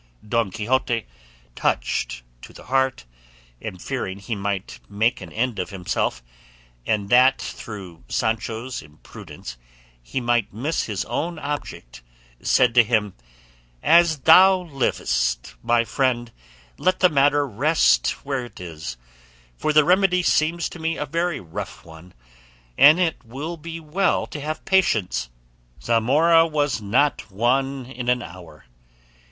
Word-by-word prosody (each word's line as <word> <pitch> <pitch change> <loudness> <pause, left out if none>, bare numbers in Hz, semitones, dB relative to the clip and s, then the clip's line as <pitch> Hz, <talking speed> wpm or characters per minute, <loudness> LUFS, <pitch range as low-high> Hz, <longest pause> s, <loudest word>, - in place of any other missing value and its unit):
Don 115 -1 +1
Quixote, 120 +3 -1 0.5
touched - - -1 0.2
to - - -12
the - - -13
heart, 130 - 0 0.6
and 90 - -7
fearing 100 -5 -4
he 100 +4 -5
might 100 -1 -4
make 110 +4 0
an - - -9
end 120 -2 -2
of 90 - -3
himself, 90 -9 -2 0.6
and 100 -2 -1
that 130 +2 +5
through 95 - -8
Sancho's 115 +2 -2
imprudence 75 -4 -11 0.4
he - - -4
might 120 -3 0
miss 140 +10 -2
his 105 -4 -3
own 160 +8 -3
object, 145 - -6 0.4
said 125 -2 +3
to 120 -1 +7
him, 110 -4 0 0.7
"As 165 -3 +4
thou 185 +5 +7
livest, 65 - -1
my 120 0 +2
friend, 120 -2 -1 0.5
let 185 0 +1
the 185 - +7
matter 145 -1 +3
rest 125 - +3 0.2
where 135 -3 -2
it 120 - -14
is, 80 -8 -7 0.6
for 155 - -1
the 150 0 +6
remedy 180 +1 +3
seems 165 +1 +1
to 175 - -11
me 160 0 -2
a 150 - -2
very 170 +3 -1
rough 85 -3 -8
one, 80 +2 -14 0.6
and 150 - +7
it 170 -6 0
will 140 +9 -6
be 165 +1 -8
well 170 +5 0
to 150 - -8
have 155 +2 -5
patience; 110 - +1 0.5
'Zamora 150 +9 +4
was 145 -6 -1
not 125 +5 +1
won 130 +6 0
in 125 -1 -5
an 125 -1 +1
hour. 85 -3 -12
125 Hz, 135 wpm, -23 LUFS, 100-150 Hz, 0.7 s, to